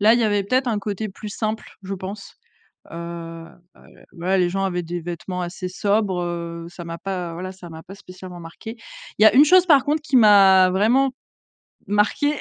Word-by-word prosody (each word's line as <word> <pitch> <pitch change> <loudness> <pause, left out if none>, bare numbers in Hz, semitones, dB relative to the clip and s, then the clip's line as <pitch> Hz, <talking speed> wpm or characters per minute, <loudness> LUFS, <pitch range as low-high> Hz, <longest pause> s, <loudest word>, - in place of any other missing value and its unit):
Là, 215 +2 +6
il 240 - +3
y 230 - +2
avait 205 -1 +1
peut-être 255 +5 +1
un 220 -3 0
côté 205 +1 -4
plus 210 +2 -9
simple, 215 +1 -4
je 195 +1 -5
pense. 195 +2 -8 0.6
Heu, - - -8
heu, 170 +1 -9 0.4
ouais, 185 +2 -1
les 180 -1 +2
gens 195 +1 -2
avaient 180 -2 -2
des 175 +1 -5
vêtements 175 +2 -5
assez 175 +1 -5
sobres, 200 0 0
heu, 170 -1 -5
ça 175 -1 -10
m'a 165 0 -6
pas, 180 -3 -5
voilà, 185 +2 -6
ça 185 -2 -12
m'a 160 0 -10
pas 195 - -12
spécialement 185 -2 -11
marqué. 220 +8 -10 0.4
Il - - +6
y - - +8
a - - +7
une 275 - +8
chose, 365 +3 +5
par 290 -7 +5
contre, 300 +2 0
qui 295 -3 -2
m'a 195 -5 +7
vraiment 230 +9 +2 0.8
marqué, 210 +8 +1
190 Hz, 205 wpm, -22 LUFS, 175-215 Hz, 0.8 s, y